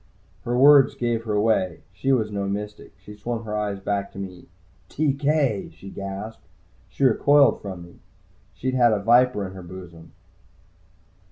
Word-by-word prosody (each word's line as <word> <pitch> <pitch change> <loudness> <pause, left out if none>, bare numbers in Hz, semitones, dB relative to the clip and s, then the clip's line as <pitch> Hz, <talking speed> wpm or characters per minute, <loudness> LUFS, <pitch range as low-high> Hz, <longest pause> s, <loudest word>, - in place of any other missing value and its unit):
Her 120 +1 -1
words 140 0 +6
gave 120 -1 -2
her 110 - -2
away 105 -5 0
she 135 +8 -1
was 110 -5 +1
no 100 -1 -3
mystic. 105 +1 -6
She 105 - -13
swung 115 +2 -4
her 105 -1 -5
eyes 105 -2 -2
back 100 0 -3
to - - -12
me: 95 -2 -8 0.4
"TK!" 140 -6 0
she 95 - -12
gasped. 100 +3 -7 0.5
She - - -4
recoiled 140 +3 +4
from 95 -4 -7
me. 85 - -16 0.6
She'd 130 0 -3
had 120 -3 +4
a 105 - 0
viper 120 -1 +3
to 95 - -10
her 95 - -9
bosom. 85 -2 -12
105 Hz, 160 wpm, -23 LUFS, 100-125 Hz, 0.6 s, words